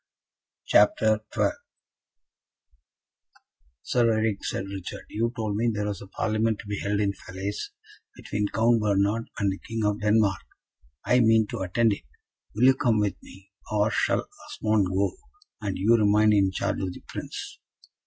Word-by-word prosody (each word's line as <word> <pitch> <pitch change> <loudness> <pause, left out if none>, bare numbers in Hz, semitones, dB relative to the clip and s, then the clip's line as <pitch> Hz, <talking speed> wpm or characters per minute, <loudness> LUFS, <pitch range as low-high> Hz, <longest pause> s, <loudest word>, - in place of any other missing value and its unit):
CHAPTER 110 +1 +4
XII - - +2 2.3
"Sir 120 -2 +2
Eric," 110 -2 0
said 95 - -3
Richard, 95 -2 -7
"you 115 +2 -1
told 110 -2 -2
me 115 +2 +2
there 105 -1 -2
was 105 -2 -4
a 100 - -10
Parlement 110 +2 0
to - - -11
be 105 0 -4
held 105 +1 -1
at 100 -1 0
Falaise, 95 +3 -5 0.5
between 105 0 -2
Count 115 +2 +2
Bernard 105 +2 +1
and 100 -1 +1
the 95 - -6
King 115 -1 -3
of 105 +1 0
Denmark. 105 -2 +2 0.6
I 125 - +4
mean 115 -2 +4
to - - -4
attend 105 +4 +2
it. 100 - -9 0.5
Will 110 - 0
you 130 +1 +8
come 120 -5 +1
with 105 -2 -1
me, 95 +1 -16 0.2
or 105 0 +2
shall - - 0 0.2
Osmond 105 -3 +1
go, 95 +2 0 0.5
and 100 -3 -3
you 110 +5 +4
remain 105 0 +4
in 100 -2 +4
charge 95 - -2
of 95 -2 -3
the - - -13
Prince?" - - -7
105 Hz, 160 wpm, -26 LUFS, 100-110 Hz, 2.3 s, you